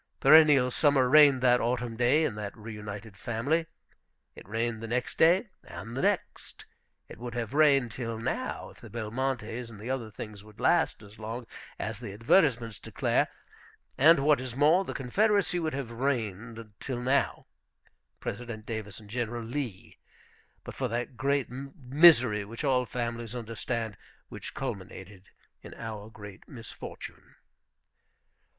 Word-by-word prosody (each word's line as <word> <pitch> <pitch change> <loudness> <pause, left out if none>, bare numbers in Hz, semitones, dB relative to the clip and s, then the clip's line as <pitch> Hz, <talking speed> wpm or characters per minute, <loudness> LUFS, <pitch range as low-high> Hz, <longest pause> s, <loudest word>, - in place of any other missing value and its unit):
Perennial 150 -5 +7
summer 140 -2 +3
reigned 140 -2 +6
that 125 -1 +5
autumn 120 0 -1
day 125 +7 +3
in 145 - 0
that 105 +1 -6
reunited 105 -1 -8
family. 130 - -1 0.7
It - - -13
reigned 115 +1 -2
the 115 - -5
next 125 +2 -2
day, 180 +7 +5
and 115 +3 -8
the 135 - -1
next. - - -2 0.4
It - - -12
would 120 0 -6
have 115 0 -3
reigned 140 -5 +4
till 115 -1 -4
now 115 - -3
if - - -19
the - - -11
Belmontes 120 +1 -3
and 110 -3 -12
the 115 +5 -4
other 125 -4 -3
things 105 -1 -9
would 105 -1 -17
last - - +2
as 105 +2 -15
long 115 +3 -5 0.3
as 110 -1 -4
the 115 -5 -7
advertisements 115 - +2
declare; - - 0 0.7
and, 155 +1 +6
what 150 -3 +4
is 130 -2 -6
more, 155 +7 +4
the - - -6
Confederacy 200 - +1
would 155 -4 -2
have 135 -4 -4
reigned 115 -3 -3
till 130 -3 -4
now, 130 +3 +1 0.7
President 115 -3 -6
Davis 110 -4 -5
and 105 - -15
General 120 +1 -3
Lee! 120 -5 -5 0.6
but - - -8
for 130 - -2
that 120 +2 -3
great 140 0 +1
misery, 130 -3 +4
which 115 +7 -8
all 130 -3 +2
families 120 -1 -4
understand, 115 -2 -4 0.3
which - - -8
culminated 95 -2 -7 0.3
in - - -11
our 110 -2 -7
great 105 -3 -12
misfortune. 115 -5 -10
120 Hz, 145 wpm, -29 LUFS, 110-135 Hz, 0.7 s, Perennial